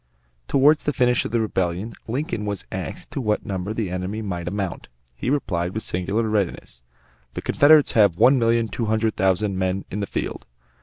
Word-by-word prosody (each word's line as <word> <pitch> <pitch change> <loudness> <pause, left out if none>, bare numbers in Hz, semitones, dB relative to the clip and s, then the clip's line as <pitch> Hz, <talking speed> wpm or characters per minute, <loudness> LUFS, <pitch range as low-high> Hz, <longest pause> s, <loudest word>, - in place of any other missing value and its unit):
Toward 145 +3 +4
the 150 - -2
finish 125 -1 +2
of - - -4
the 120 - +1
Rebellion, 95 0 -1
Lincoln 125 -2 -2
was 100 -2 -4
asked - - -6
to - - -3
what 105 -3 0
number 95 0 -3
the 110 -4 -2
enemy 95 +4 -3
might 90 -4 -4
amount. 95 -1 -3 0.3
He 60 - -4
replied 95 -10 -1
with 110 - -3
singular 100 +6 -1
readiness: 100 - -2 0.5
"The - - -3
Confederates 150 0 +5
have 100 -6 +4
one 130 +6 +5
million 115 0 +2
two 115 - -3
hundred 110 0 +1
thousand 95 0 +1
men 95 +1 -1
in 105 - -3
the 100 - -2
field." - - -4
105 Hz, 185 wpm, -23 LUFS, 95-115 Hz, 0.5 s, Confederates